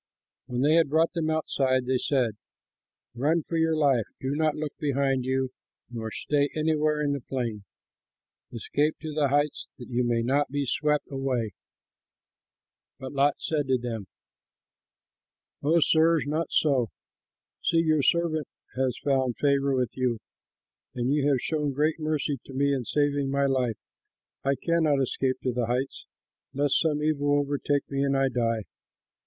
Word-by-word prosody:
When 125 -1 -2
they 150 +3 +4
had 165 -4 +3
brought 160 +4 +2
them 165 -3 -1
outside, 135 -5 +1
they 130 0 +1
said, 125 -5 0 0.8
"Run 150 +7 +1
for 165 - -5
your 160 0 +2
life; 135 -7 +2
do 130 0 -2
not 155 0 +1
look 150 -1 -4
behind 135 -3 0
you 130 0 0 0.4
nor 115 -2 -4
stay 145 +5 0
anywhere 155 -1 +1
in 145 -1 +1
the 140 - -3
plain. 115 -5 -4 0.9
Escape 145 +6 0
to 155 -1 -5
the 145 -1 +2
heights, 145 +2 0
that 120 - -10
you 125 0 +1
may 120 -1 +1
not 140 +4 +1
be 145 +1 -1
swept 150 +3 0
away!" 130 -5 -1 1.5
But 130 0 -7
Lot 140 +1 +3
said 150 -3 -1
to 130 -1 +3
them, 115 -5 -5 1.5
"Oh, 160 +4 +3
sirs, 160 +1 +4
not 155 +3 -1
so! 135 -7 +2 0.7
See, 165 - +2
your 155 -2 +3
servant 155 +1 +1 0.3
has 130 -2 0
found 130 -4 +1
favor 140 -1 +2
with 125 -2 -1
you, 125 -3 0 0.8
and 125 +3 0
you 145 -1 +2
have 135 -4 +2
shown 150 -3 -1
great 150 +4 +1
mercy 155 -3 -1
to 135 - -11
me 140 +1 +2
in 130 -3 -2
saving 145 0 +1
my 140 0 +1
life. 130 -5 0 0.7
I 140 +1 +2
cannot 160 -2 +1
escape 130 0 -1
to 125 - 0
the 120 -1 -1
heights, 125 +3 -2 0.5
lest 140 0 +2
some 150 -2 0
evil 145 -2 +2
overtake 145 0 0
me, 140 0 0
and 140 -1 +1
I 135 0 +2
die. 115 -3 0
140 Hz, 160 wpm, -27 LUFS, 130-150 Hz, 1.5 s, they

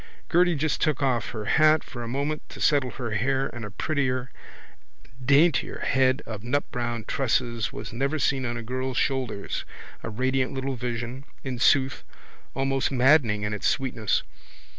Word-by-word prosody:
Gerty 175 0 +4
just 155 +1 0
took 150 -3 +1
off 125 -5 +1
her 110 -2 -5
hat 155 +5 +4
for 120 - -8
a 120 - -4
moment 140 +5 -2
to - - -10
settle 140 -4 +3
her 120 -2 -5
hair 130 +6 0
and 120 -2 -6
a 105 - -5
prettier, 130 0 -1 0.7
a - - -22
daintier 145 +6 +3
head 130 +1 +2
of 110 -3 -6
nutbrown 120 -2 -2
tresses 120 -4 0
was - - -7
never 140 +6 0
seen 135 -2 +1
on 120 -1 -2
a 115 - -5
girl's 130 +2 -3
shoulders—a 130 -4 -3
radiant 130 +4 0
little 135 0 -2
vision, 120 +2 -4 0.2
in 130 -3 -4
sooth, 135 +1 +3 0.5
almost 135 +1 0
maddening 125 -5 +4
in 105 0 -1
its 105 - -1
sweetness. 125 -6 0
130 Hz, 160 wpm, -26 LUFS, 120-140 Hz, 0.7 s, Gerty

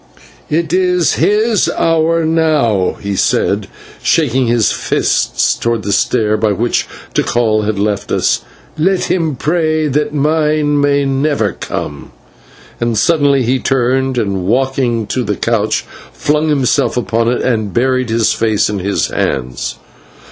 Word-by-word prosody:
"It 165 +2 -1
is 180 -2 +2
his 215 0 +2
hour 165 0 +2
now," 150 - +1
he 100 -1 -3
said, - - 0 0.3
shaking 130 -5 +1
his 115 -4 +2
fist - - 0
towards 115 -4 -1
the 100 - -1
stair 110 -1 +1
by 105 -1 +1
which 120 +4 -1 0.3
Tikal 110 -3 +1
had 110 -1 -1
left 100 0 -2
us, - - +1 0.3
"but 155 - -3
let 190 0 +2
him 160 -5 0
pray 155 +2 0
that 150 +1 0
mine 150 0 +1
may 145 0 +2
never 135 -6 0
come," 70 -1 -6 0.7
and 120 -2 -1
suddenly 140 0 +3
he 130 +3 +1
turned 130 0 0
and, 100 -5 -1
walking 125 -1 0
to 125 +5 -2
a 105 - +1
couch, 110 -1 0 0.3
flung 150 +1 0
himself 135 -4 +1
upon 115 -1 0
it 125 - -1
and 110 -5 0
buried 130 +1 0
his 115 -1 +2
face 110 -2 +1
in 100 - -3
his 100 +2 0
hands. 65 -1 -2
130 Hz, 140 wpm, -14 LUFS, 110-155 Hz, 0.7 s, suddenly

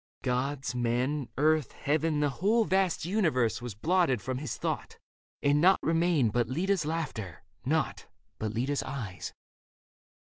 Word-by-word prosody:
Gods, 130 0 -1
men, 125 +3 0
earth, 155 -2 +2
heaven, 150 +1 0
the 145 - +3
whole 220 +4 +4
Vast 190 -4 +1
universe 160 - +1
was 120 -5 -6
blotted 165 - +2
from 130 +3 -3
his 145 -5 -4
thought - - -3 0.5
And 145 +1 +4
nought 190 +2 +6
remained 165 -8 +2
but 120 -2 +1
Leda's 175 +3 0
laughter, 120 - -4 0.2
nought 155 +4 0 0.3
But 110 -1 -2
Leda's 130 +6 -1
eyes. 115 -9 -5
145 Hz, 135 wpm, -29 LUFS, 125-165 Hz, 0.5 s, nought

